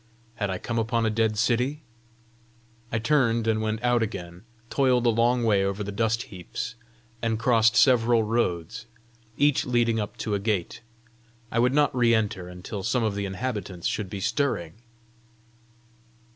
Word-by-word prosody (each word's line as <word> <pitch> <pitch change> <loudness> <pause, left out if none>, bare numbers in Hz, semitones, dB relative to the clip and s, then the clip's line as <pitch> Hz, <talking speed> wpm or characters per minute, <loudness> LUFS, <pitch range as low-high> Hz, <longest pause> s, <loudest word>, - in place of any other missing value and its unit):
Had 100 -2 -1
I 95 - -2
come 115 +4 -3
upon 115 0 0
a 110 - +1
dead 110 -1 +1
city? 125 +7 0 1.1
I 110 - 0
turned 115 -2 +2
and 110 -1 +1
went 110 +1 -2
out 120 -1 +3
again, 90 -3 -5 0.3
toiled 130 -3 +2
a 120 - +5
long 120 +2 +2
way 105 -4 +3
over 100 +1 -2
the 100 - -5
dust 110 +3 0
heaps, 90 +5 -6 0.5
and 115 -1 0
crossed 115 -1 +3
several 120 -3 +4
roads, 110 -1 -2 0.5
each 145 -1 +3
leading 120 -2 +1
up 105 -1 -4
to 110 - -3
a 100 - +1
gate: 100 -2 -2 0.7
I 115 - 0
would 125 +3 +3
not 145 -3 +3
re 120 -2 +4
enter 100 -5 -2
until 90 +3 -7
some 120 +4 0
of 110 -2 0
the 100 0 -3
inhabitants 100 -4 -5
should 105 -3 -2
be 100 0 -5
stirring. 105 - -1
115 Hz, 160 wpm, -26 LUFS, 100-120 Hz, 1.1 s, a